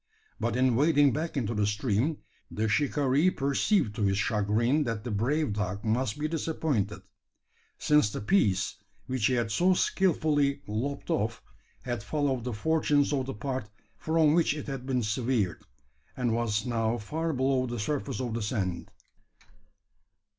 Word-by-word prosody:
But 115 Hz, 0 st, -1 dB
in 125 Hz, -1 st, +3 dB
wading 145 Hz, 0 st, +4 dB
back 160 Hz, 0 st, -3 dB
into 115 Hz, -3 st, -1 dB
the 105 Hz, -2 st, +1 dB
stream, 110 Hz, +7 st, 0 dB, 0.3 s
the 110 Hz, +1 st, -1 dB
shikaree 140 Hz, +6 st, +2 dB
perceived 140 Hz, -, +1 dB
to 110 Hz, -, -4 dB
his 95 Hz, -1 st, +2 dB
chagrin 115 Hz, +7 st, +1 dB
that 115 Hz, -3 st, -3 dB
the 120 Hz, -, -4 dB
brave 130 Hz, +5 st, 0 dB
dog 100 Hz, 0 st, -3 dB
must 110 Hz, +1 st, 0 dB
be 150 Hz, +1 st, -1 dB
disappointed: 145 Hz, -, -2 dB, 0.7 s
since 150 Hz, -7 st, +3 dB
the -, -, -5 dB
piece 105 Hz, -, +1 dB, 0.3 s
which 130 Hz, -3 st, 0 dB
he 130 Hz, -, +1 dB
had 115 Hz, -2 st, -1 dB
so 180 Hz, +9 st, +3 dB
skilfully 150 Hz, -7 st, +1 dB
lopped 125 Hz, +7 st, -3 dB
off, 110 Hz, +3 st, -1 dB, 0.4 s
had 120 Hz, -4 st, -3 dB
followed 135 Hz, -1 st, -1 dB
the 125 Hz, -, -2 dB
fortunes 150 Hz, +3 st, +1 dB
of 130 Hz, -2 st, -1 dB
the 135 Hz, -, -4 dB
part 130 Hz, -1 st, -4 dB, 0.3 s
from 160 Hz, +5 st, +2 dB
which 165 Hz, -2 st, +2 dB
it 150 Hz, -, -6 dB
had 135 Hz, -3 st, -6 dB
been 125 Hz, -3 st, 0 dB
severed, 110 Hz, -4 st, -1 dB, 0.6 s
and 120 Hz, -3 st, 0 dB
was 115 Hz, -2 st, 0 dB
now 115 Hz, -1 st, 0 dB
far 160 Hz, +10 st, -3 dB
below 130 Hz, -2 st, +1 dB
the 120 Hz, 0 st, -4 dB
surface 135 Hz, +4 st, -2 dB
of 125 Hz, -3 st, -3 dB
the 115 Hz, -, -2 dB
sand! 100 Hz, -5 st, -2 dB
125 Hz, 155 wpm, -28 LUFS, 110-145 Hz, 0.7 s, wading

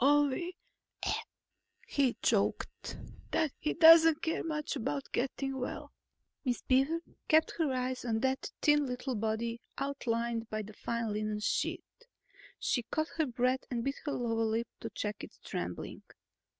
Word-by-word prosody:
Only," 290 Hz, +5 st, +3 dB, 1.3 s
he 280 Hz, -, +2 dB
choked, -, -, 0 dB, 0.3 s
"that 315 Hz, -3 st, +1 dB
he 305 Hz, -, -1 dB
doesn't 325 Hz, -1 st, +8 dB
care 325 Hz, -, 0 dB
much 305 Hz, -2 st, -2 dB
about 275 Hz, +2 st, -3 dB
getting 270 Hz, +1 st, -1 dB
well." 250 Hz, -, -4 dB, 0.5 s
Miss 250 Hz, -4 st, -1 dB
Beaver 270 Hz, +6 st, +3 dB, 0.3 s
kept 315 Hz, 0 st, +5 dB
her 310 Hz, -4 st, +2 dB
eyes 255 Hz, 0 st, -1 dB
on 225 Hz, -2 st, 0 dB
that 265 Hz, 0 st, 0 dB
thin 295 Hz, -1 st, +5 dB
little 250 Hz, +1 st, -3 dB
body 225 Hz, +1 st, -1 dB, 0.2 s
outlined 235 Hz, -4 st, -1 dB
by 215 Hz, 0 st, -2 dB
the 215 Hz, +1 st, -10 dB
fine 230 Hz, 0 st, -2 dB
linen 215 Hz, 0 st, -1 dB
sheet. 210 Hz, -, 0 dB, 0.7 s
She 255 Hz, -, +1 dB
caught 310 Hz, +7 st, -2 dB
her 315 Hz, -2 st, +2 dB
breath 255 Hz, +1 st, +1 dB
and 235 Hz, -2 st, -1 dB
bit 275 Hz, +2 st, -1 dB
her 290 Hz, -, -1 dB
lower 225 Hz, -2 st, 0 dB
lip 225 Hz, +1 st, 0 dB
to 225 Hz, -, -5 dB
check 210 Hz, -1 st, -4 dB
its -, -, -10 dB
trembling. -, -, -4 dB
255 Hz, 145 wpm, -32 LUFS, 230-290 Hz, 1.3 s, doesn't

